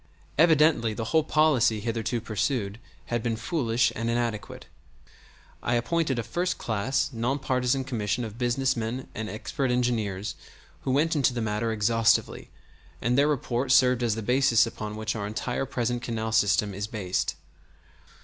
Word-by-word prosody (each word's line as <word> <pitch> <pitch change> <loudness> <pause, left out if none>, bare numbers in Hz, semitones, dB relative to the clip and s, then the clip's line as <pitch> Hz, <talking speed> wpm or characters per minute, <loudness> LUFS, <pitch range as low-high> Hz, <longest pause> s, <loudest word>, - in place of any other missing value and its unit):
Evidently 150 -8 +4
the 115 - -3
whole 160 -1 +5
policy 145 -8 +3
hitherto 115 +1 -2
pursued 110 -1 -2 0.3
had 120 - +1
been 115 0 -1
foolish 120 -3 0
and 115 +1 -2
inadequate. 115 -3 -3 1.0
I 120 - 0
appointed 135 +3 0
a 120 - -1
first 175 +11 -2
class 135 +6 -1
non 120 +4 0
partisan 130 -1 0
commission 115 -3 -2
of 110 +1 -7
business 125 +2 +1
men 115 +3 -4
and 110 0 -4
expert 130 +5 -3
engineers 110 -5 -1 0.5
who 130 - +1
went 155 +5 +2
into 135 -4 +2
the - - -1
matter 110 +1 -1
exhaustively, 115 +1 +1 0.5
and 120 +2 +1
their 140 +2 +4
report 130 -3 -1
served 125 -1 +5
as 115 -3 +1
the 110 - -4
basis 125 0 +4
upon 105 -2 -6
which 110 +1 -3
our 100 -2 -3
entire 120 +5 -3
present 120 -2 -1
canal 110 -2 -3
system 100 -2 +2
is 100 +1 -4
based. 100 -5 -2
120 Hz, 155 wpm, -27 LUFS, 110-130 Hz, 1.0 s, whole